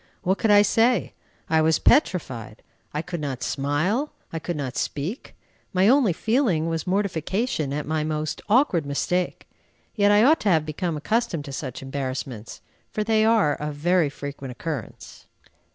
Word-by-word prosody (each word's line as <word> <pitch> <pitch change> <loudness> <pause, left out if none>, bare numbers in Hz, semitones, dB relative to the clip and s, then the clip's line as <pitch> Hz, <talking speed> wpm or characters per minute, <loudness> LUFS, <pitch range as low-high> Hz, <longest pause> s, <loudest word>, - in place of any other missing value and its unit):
What 190 +2 +1
could 225 - +1
I 205 0 +7
say? 230 +4 +2 0.3
I 160 0 +3
was 160 0 +3
petrified. 130 - +1 0.3
I 150 +2 -3
could 175 -2 -5
not 135 -4 -4
smile, 155 - 0 0.2
I 165 - -2
could 175 +2 -4
not 130 -3 -4
speak. 160 - -4 0.4
My 190 +1 +4
only 255 -4 +5
feeling 220 - +1
was 165 -1 -3
mortification 190 - -1
at 145 +1 -3
my 155 0 -1
most 155 -1 -3
awkward 215 - +3
mistake. 175 +5 -2 0.5
Yet 205 -3 +3
I 205 +1 +5
ought 310 +6 +5
to 210 - 0
have 160 -4 +3
become 155 +1 -3
accustomed 215 -2 -1
to 140 - -7
such 130 -2 -5
embarrassments, 130 -4 -5 0.3
for 215 - -2
they 220 0 +2
are 220 -9 +4
of 150 0 -5
very 170 +1 +2
frequent 140 -2 -7
occurrence. 135 -1 -7
165 Hz, 160 wpm, -24 LUFS, 145-205 Hz, 0.5 s, I